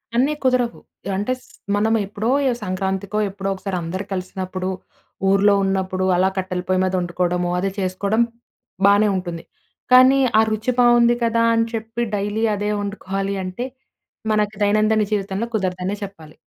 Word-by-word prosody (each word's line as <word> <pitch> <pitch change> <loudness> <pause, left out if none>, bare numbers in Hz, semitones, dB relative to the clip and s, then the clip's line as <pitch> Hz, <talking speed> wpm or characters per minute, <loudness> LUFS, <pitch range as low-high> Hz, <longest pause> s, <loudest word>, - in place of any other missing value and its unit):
అన్నీ 270 +5 +3
కుదరవు. 250 -2 +1 0.4
అంటే 210 +6 0
స్ - - -20 0.3
మనం 220 +2 +2
ఎప్పుడో 210 +3 -3 0.2
ఎ - - +1
సంక్రాంతికో, 190 +2 -2
ఎప్పుడో 195 0 -4
ఒకసారి 190 -1 -4
అందరూ 185 +4 -4
కలిసినప్పుడు, 185 0 -4 0.6
ఊర్లో 200 +1 +5
ఉన్నప్పుడు 190 -1 0
అలా 185 +2 +3
కట్టెల 185 -1 -2
పొయ్యి 185 0 +2
మీద 185 0 0
వండుకోవడము 175 0 -1
అదే 195 +2 0
చేసుకోవడం 200 +4 +1 0.6
బానే 205 +1 +5
ఉంటుంది. 175 -3 -4 0.5
కానీ 260 +2 +7 0.2
ఆ - - +7
రుచి 215 +3 0
బావుంది 240 -1 +5
కదా 230 0 +2
అని 230 0 +2
చెప్పి 225 +1 -4
డైలీ 205 +2 -1
అదే 205 +1 -2
వండుకోవాలి 195 -1 -3
అంటే 185 +6 -4 0.7
మనకి 210 0 +1
దైనందిన 215 +1 +3
జీవితంలో 200 +1 -1
కుదరదనే 185 -1 -1
చెప్పాలి. 165 -6 -10
200 Hz, 140 wpm, -21 LUFS, 185-220 Hz, 0.7 s, కానీ